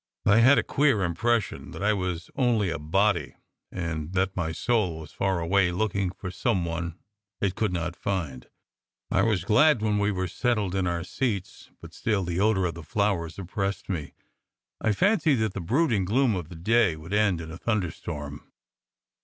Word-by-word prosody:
I 105 +3 +5
had 130 +5 +7
a - - +3
queer 135 -8 +2
impression 115 +6 0
that - - -6
I 110 +1 +3
was 90 -4 -3
only 115 -7 +1
a - - -3
body, 95 +8 +1 0.4
and 85 -2 -4
that 95 0 0
my 80 -3 -1
soul 95 -2 0
was 80 -1 -10
far 95 -2 0
away 90 +2 +2
looking 100 0 0
for 95 0 -7
some 95 -2 0
one 85 0 -4 0.4
it 100 -2 0
could 110 0 -1
not 85 -1 -2
find. 80 -13 -3 0.6
I 95 - +3
was 110 -3 +1
glad 120 +2 +4
when 105 -1 +1
we 100 +1 +2
were 95 -1 -2
settled 105 -1 0
in 95 -2 0
our 85 -1 -1
seats, 100 -2 -3
but - - -11
still 105 -4 0
the 85 0 -2
odour 100 -2 +3
of 85 - -1
the 85 - -9
flowers 85 -1 -1
oppressed 100 +2 -3
me. 80 -7 -4 0.7
I 110 - +2
fancied 160 - +3
that 110 -5 0
the 100 - -4
brooding 115 - +1
gloom 120 +3 +2
of 85 -4 -5
the 85 - -9
day 105 +1 +2
would 80 +5 -8
end 105 -4 +2
in 80 0 -7
a 85 - -9
thunderstorm. 80 -8 -4
95 Hz, 185 wpm, -26 LUFS, 85-110 Hz, 0.7 s, had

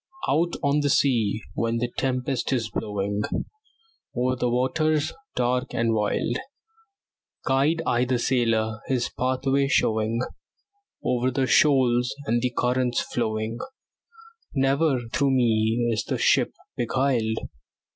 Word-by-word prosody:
Out 170 +4 +1
on 140 +1 +3
the 145 -1 +1
sea, 115 -6 +2
when 115 0 -1
the 120 +1 -2
tempest 130 0 -1
is 115 -4 -1
blowing, 100 0 -2 0.9
Over 130 +1 +1
the 125 -1 0
waters 145 +5 +1 0.2
dark 125 +1 0
and 115 0 +1
wild, 105 -2 0 1.1
Guide 145 +5 +2
I 120 +1 +2
the 125 0 +1
sailor, 115 -3 0
his 125 -2 0
pathway 135 +2 +1
showing 110 -3 +1 0.8
Over 125 0 +1
the 130 +1 0
shoals 130 -4 +3
and 120 +1 +1
the 125 - +1
currents 125 0 +1
flowing; 110 -1 -2 1.0
Never 135 0 +2
through 140 -2 +2
me 115 -1 +2
is 110 - 0
the - - -2
ship - - +3 0.2
beguiled. 120 -3 0
125 Hz, 120 wpm, -25 LUFS, 115-135 Hz, 1.1 s, on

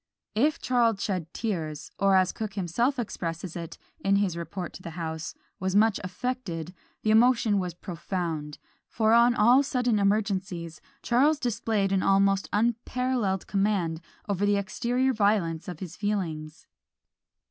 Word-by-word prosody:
If 290 +8 +2
Charles 235 -5 +2
shed 180 -5 -2
tears, 160 -9 -4
or 195 -1 +4
as 185 -1 +4
Cooke 215 -3 -5
himself 235 - 0
expresses 170 -6 -4
it, 170 -1 -6 0.2
in 195 0 +2
his 200 -4 +1
report 175 +2 -5
to - - -10
the 170 - -7
House, 160 -2 -4 0.2
"was 190 -1 -1
much 215 0 +4
affected," 185 - -4 0.3
the 215 - +2
emotion 225 -2 +4
was 180 -2 -3
profound: 170 -4 -4 0.3
for 220 0 +2
on 235 +1 +5
all 245 +5 +6
sudden 245 -5 +1
emergencies 195 -5 -1 0.2
Charles 280 +6 +3
displayed 220 -5 0
an 195 -1 +2
almost 195 0 +3
unparalleled 235 -2 0
command 195 -5 0 0.3
over 200 -1 -1
the 205 0 +3
exterior 245 +6 0
violence 200 -7 +1
of 175 -4 -7
his 180 -2 -6
feelings. 165 -7 -3
200 Hz, 140 wpm, -27 LUFS, 175-225 Hz, 0.3 s, all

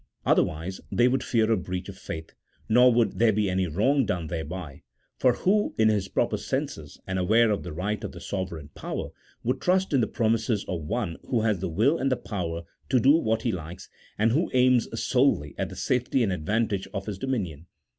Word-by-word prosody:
Otherwise 85 +5 +1
they 120 - +4
would 130 +1 +1
fear 115 -2 +2
a - - +5
breach 90 -1 -4
of - - -8
faith, 80 0 -7 0.3
nor 125 +3 +6
would 115 -1 +1
there 115 -1 +5
be 105 0 +1
any 95 0 0
wrong 130 - +2
done 90 -7 -2
thereby: 80 -2 -6 0.4
for 125 - +4
who 205 - +1
in 110 0 +4
his 100 -3 +1
proper - - 0
senses, - - -4
and 95 0 -2
aware 110 +5 +4
of 105 - 0
the 90 - -7
right 100 +7 -3
of - - -4
the - - -10
sovereign 85 -6 -5
power, - - -5 0.3
would 125 - -1
trust 185 -1 +2
in 135 - +4
the 110 - +1
pro 110 -2 0
mises 110 -2 0
of 90 -3 -3
one 85 +2 -3
who 120 -3 +2
has 105 -4 +1
the 95 - -2
will 120 - +2
and 135 +1 0
the 130 - +2
power 85 -5 -4 0.3
to 130 -1 +4
do 130 +4 +5
what 110 -8 +1
he 120 - +1
likes, 85 -2 -7 0.3
and 110 +2 +3
who 155 +8 +1
aims 125 -2 +4
solely 115 - +2
at - - -1
the - - -9
safety 125 0 +1
and 100 -4 +1
advantage 100 +3 -1
of 100 +1 -4
Ins 100 -3 -4
dominion 90 - -3
105 Hz, 210 wpm, -26 LUFS, 90-125 Hz, 0.4 s, nor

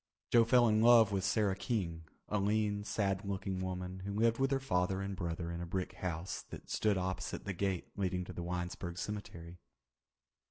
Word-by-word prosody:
Joe 115 -1 +6
fell 120 +1 +5
in 110 0 +3
love 115 -2 +7
with 95 -2 0
Sarah 100 0 +2
King, 85 -7 -2 0.2
a 105 - 0
lean, 105 0 +1
sad 100 -2 0
looking 95 -1 -3
woman 95 0 -4
who 100 +2 -5
lived 115 +2 +3
with 135 0 +3
her 135 -1 +1
father 95 -7 0
and 100 0 -3
brother 85 -1 -3
in 85 0 -4
a - - -3
brick 90 +1 -2
house 90 0 -4
that - - -9
stood 105 -3 +2
opposite 95 0 -3
the 100 - -2
gate 95 -1 -2
leading 90 -2 -1
to - - -8
the - - -5
Winesburg 90 0 -4
Cemetery. 90 -4 -6
95 Hz, 190 wpm, -34 LUFS, 90-105 Hz, 0.2 s, love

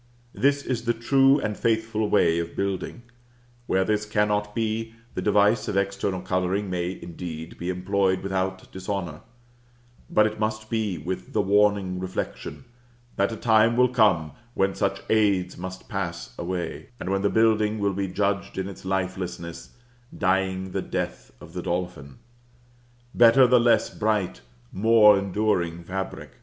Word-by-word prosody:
This 140 +6 +2
is 120 -2 -3
the 120 - +1
true 135 +4 +4
and 105 -5 -2
faithful 110 -1 0
way 85 -5 +3
of 85 0 -5
building; 100 +4 -3 0.6
where 95 - +2
this 105 +1 0
cannot 105 0 0
be, 115 0 -2 0.2
the - - -3
device 105 +2 +3
of 100 - -1
external 100 -1 -1
coloring 95 +2 -1
may, 90 +1 -2
indeed, 80 -1 -7
be 85 - -3
employed 95 +1 0
without 95 -1 -3
dishonor; 95 -4 -4 0.9
but 105 - +4
it 110 0 -3
must 110 0 -2
be 110 -5 -1
with 95 +2 -5
the - - +2
warning 100 -2 +2
reflection, 95 +7 -5 0.5
that 100 +3 +1
a - - -4
time 110 +1 +3
will 125 0 +5
come 105 -10 +3 0.2
when 95 0 +1
such 100 0 -1
aids 100 -5 +2
must 95 +1 -8
pass 85 -4 -4
away, 90 0 -4
and 95 - -3
when 95 0 +1
the 100 - +2
building 110 -1 +2
will 100 -1 0
be 100 +1 -2
judged 100 +1 -1
in 95 0 -2
its 100 - -10
lifelessness, 95 0 -4 0.4
dying 95 -1 0
the - - -2
death - - -4
of - - -13
the - - -4
dolphin. 85 -6 -4 1.0
Better 120 +2 +7
the 125 0 +5
less 115 -1 +3
bright, 105 -4 -1 0.3
more 105 -1 +6
enduring 90 -4 -1
fabric. 95 +2 -6
100 Hz, 150 wpm, -25 LUFS, 95-110 Hz, 1.0 s, Better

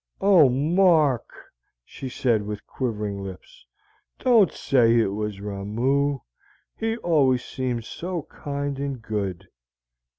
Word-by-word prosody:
"Oh, 185 -8 +6
Mark," 155 -1 +3 0.6
she 135 - -8
said, 120 -3 +1
with 105 0 -6
quivering 105 -5 -3
lips, 95 -9 -11 0.5
"don't 230 - +4
say 120 -4 +3
it 110 -4 +2
was 105 -1 -4
Ramoo. 115 +8 -1 0.6
He 225 0 -2
always 135 - +2
seemed 125 -3 -3
so 175 +2 -5
kind 140 -1 -5
and 140 -2 -3
good." 100 -4 -4
130 Hz, 110 wpm, -24 LUFS, 105-145 Hz, 0.6 s, Oh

